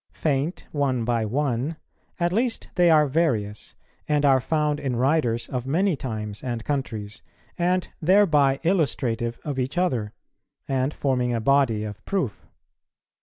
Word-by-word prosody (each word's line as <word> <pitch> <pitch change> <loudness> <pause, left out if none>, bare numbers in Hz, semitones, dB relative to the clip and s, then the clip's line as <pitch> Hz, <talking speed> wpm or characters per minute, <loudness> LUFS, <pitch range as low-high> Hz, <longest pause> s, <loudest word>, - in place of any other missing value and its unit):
Faint 150 +3 -1
one 135 -5 0
by 120 -1 +1
one, 135 +5 -1 0.4
at 175 0 +1
least 235 +3 -1
they 175 -2 +4
are 155 -2 +6
various, 125 -9 -1 0.3
and 150 -1 +2
are 135 -2 +5
found 150 0 0
in 130 -3 -2
writers 125 -2 +1
of 125 0 -3
many 180 +5 +2
times 110 -6 -5
and 120 -3 -4
countries, 110 -7 -3 0.3
and 180 +1 0
thereby 155 -7 +4
illustrative 120 -9 0
of 145 -3 -3
each 130 +6 -2
other, 125 - 0 0.6
and 135 +1 0
forming 125 -4 0
a - - 0
body 120 -3 +2
of 105 0 -7
proof. 180 - -2
135 Hz, 140 wpm, -24 LUFS, 120-155 Hz, 0.6 s, are